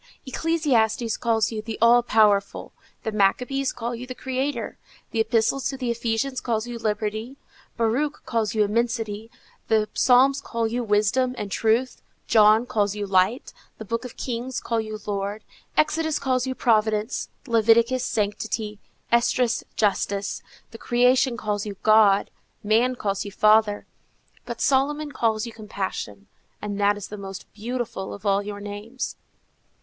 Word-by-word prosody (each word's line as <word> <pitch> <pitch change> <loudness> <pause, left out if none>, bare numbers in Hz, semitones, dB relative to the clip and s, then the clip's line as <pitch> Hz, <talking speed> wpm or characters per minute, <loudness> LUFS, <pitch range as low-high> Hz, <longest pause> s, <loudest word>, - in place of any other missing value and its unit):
"Ecclesiastes 255 -7 +1
calls 225 -2 +1
you 220 -1 -4
the 220 0 -6
All 235 +1 +6
powerful; 210 -4 +2 0.3
the 220 - -2
Maccabees 250 +7 +1
call 240 0 -4
you 245 +2 -7
the 255 - -6
Creator; 265 +3 -3 0.3
the 225 - -2
Epistle 225 +3 +2
to 270 0 -3
the 250 -2 -1
Ephesians 235 +3 -1
calls 225 -2 -1
you 240 -1 -6
liberty; 215 +3 -3 0.4
Baruch 250 +6 0
calls 225 -2 -1
you 215 - +4
Immensity; 225 0 -1 0.4
the 215 -1 +2
Psalms 270 +2 +4
call 230 -4 -2
you 240 +2 -1
Wisdom 230 +4 +1
and 205 -1 -5
Truth; 230 +5 +1 0.2
John 220 +1 +5
calls 205 -4 0
you 205 -1 -3
Light; 190 +5 +1 0.2
the 220 - -8
Books 230 +3 -2
of 250 - -9
Kings 250 +1 -3
call 230 -1 -1
you 215 -1 -6
Lord; 205 +1 -3 0.3
Exodus 310 0 +2
calls 255 -2 0
you 260 - -2
Providence; 220 -1 +1 0.2
Leviticus, 235 +1 +3
Sanctity; 210 -1 -2 0.3
Esdras, 235 0 +2
Justice; 200 -1 0 0.3
the 225 - -11
creation 250 +1 +3
calls 210 -2 -2
you 205 - -5
God; 215 -2 +5 0.3
man 230 +5 +2
calls 200 -4 -2
you 205 - -6
Father; 215 0 +3 0.6
but - - -5
Solomon 290 +2 +1
calls 225 -4 0
you 235 - -7
Compassion, 190 - -5 0.3
and 205 -1 -4
that 205 0 +3
is 205 - -8
the 210 - -7
most 195 -1 -8
beautiful 225 -3 -4
of 200 +1 -14
all 200 0 +3
your 205 0 -6
names." 205 +5 -6
225 Hz, 150 wpm, -24 LUFS, 210-250 Hz, 0.6 s, All